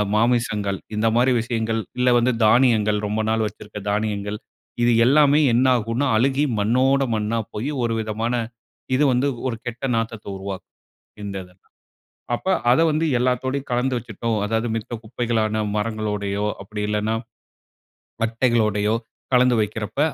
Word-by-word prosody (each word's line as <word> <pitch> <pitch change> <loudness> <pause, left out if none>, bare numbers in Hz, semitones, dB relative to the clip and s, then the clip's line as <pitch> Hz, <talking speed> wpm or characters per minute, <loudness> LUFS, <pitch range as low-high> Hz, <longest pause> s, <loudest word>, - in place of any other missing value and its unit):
மாமிசங்கள் 105 -4 +1 0.2
இந்த 110 +1 +1
மாரி 125 +2 +4
விஷயங்கள். 115 -1 -1 0.2
இல்ல, 125 0 +4
வந்து 120 +2 +2
தானியங்கள் 110 -2 +4
ரொம்ப 110 +2 -1
நாள் 110 0 +1
வச்சிருக்க 105 0 -9
தானியங்கள். 105 0 -2 0.4
இது 120 - +4
எல்லாமே 145 +2 +5
என்னாகுன்னா, 125 +1 +2
அழுகி 135 +5 +2
மண்ணோடு 130 +6 +2
மண்ணா 110 +2 -1
போயி 125 +8 -3
ஒரு 115 - -1
விதமான 110 +2 -2 0.6
இது 140 - +3
வந்து 125 +3 +2 0.2
ஒரு 120 - -2
கெட்ட 120 +2 -6
நாத்தத்த 115 -1 -3
உருவாக்கும், 95 0 -7 0.5
இந்த 100 -1 -5
இதெல்லாம். 90 +1 -20 0.7
அப்ப 155 - -4 0.2
அத 125 - +5
வந்து 155 +2 0
எல்லாத்தோடையும் 130 +2 -1
கலந்து 125 +2 +1
வச்சுட்டோம். 115 0 -3
அதாவது 110 +2 -1
மித்த 115 +1 -6
குப்பைகளான, 110 -1 -1 0.2
மரங்களோடையோ 105 -2 -2 0.2
அப்டி 105 +1 -5
இல்லனா 105 +1 0 1.1
பட்டைகளோடையோ 115 -2 +1 0.4
கலந்து 125 0 +5
வைக்கிறப்ப, 105 +3 -4
115 Hz, 130 wpm, -22 LUFS, 105-125 Hz, 1.1 s, எல்லாமே